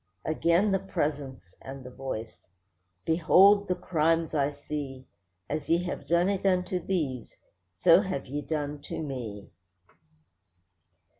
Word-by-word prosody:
Again 170 Hz, +5 st, +2 dB
the 195 Hz, -, +2 dB
Presence 145 Hz, -, -4 dB
and 135 Hz, 0 st, -8 dB
the 125 Hz, -, -9 dB
Voice: 110 Hz, -8 st, -7 dB, 0.6 s
'Behold 195 Hz, +5 st, +5 dB
the 180 Hz, -, +1 dB
crimes 165 Hz, -1 st, +1 dB
I 140 Hz, -2 st, +2 dB
see, 145 Hz, -2 st, -6 dB, 0.4 s
As 150 Hz, -1 st, -4 dB
ye 170 Hz, +2 st, +3 dB
have 180 Hz, -, -5 dB
done 170 Hz, +2 st, +3 dB
it 200 Hz, -1 st, -1 dB
unto 185 Hz, -1 st, +1 dB
these, 140 Hz, -, -2 dB, 0.4 s
so 165 Hz, -, +6 dB
have 185 Hz, -8 st, -3 dB
ye 145 Hz, +3 st, -4 dB
done 145 Hz, -1 st, -3 dB
to -, -, -5 dB
me. 115 Hz, -8 st, -6 dB
150 Hz, 130 wpm, -28 LUFS, 135-180 Hz, 0.6 s, so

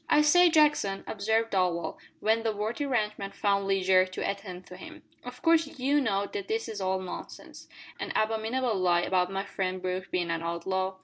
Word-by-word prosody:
"I 300 Hz, -, +5 dB
say, 355 Hz, +4 st, +6 dB
Jackson," 295 Hz, -, +3 dB
observed 220 Hz, +2 st, 0 dB
Darvall, 180 Hz, -3 st, 0 dB, 0.2 s
when 220 Hz, +1 st, +2 dB
the 225 Hz, -1 st, 0 dB
worthy 220 Hz, +8 st, -2 dB
ranch 215 Hz, -5 st, 0 dB
man 195 Hz, 0 st, -5 dB
found 200 Hz, -1 st, 0 dB
leisure 190 Hz, -1 st, +4 dB
to 185 Hz, -, -4 dB
attend 190 Hz, -2 st, -5 dB
to 180 Hz, -, -11 dB
him, 315 Hz, -, -11 dB, 0.2 s
"of 250 Hz, 0 st, -10 dB
course 330 Hz, -1 st, +4 dB
you 280 Hz, +3 st, +2 dB
know 200 Hz, -5 st, 0 dB
that 400 Hz, -2 st, -4 dB
this 445 Hz, +1 st, -1 dB
is 215 Hz, -3 st, -5 dB
all 190 Hz, 0 st, 0 dB
nonsense 185 Hz, -1 st, -9 dB, 0.3 s
an -, -, -4 dB
abominable 225 Hz, +3 st, 0 dB
lie 180 Hz, -3 st, +2 dB
about 180 Hz, 0 st, +1 dB
my 195 Hz, +1 st, -2 dB
friend 185 Hz, -1 st, -3 dB
Brooke 185 Hz, +1 st, -3 dB
being 175 Hz, -2 st, -1 dB
an 165 Hz, 0 st, -2 dB
outlaw?" 185 Hz, +3 st, -2 dB
200 Hz, 190 wpm, -28 LUFS, 185-250 Hz, 0.3 s, say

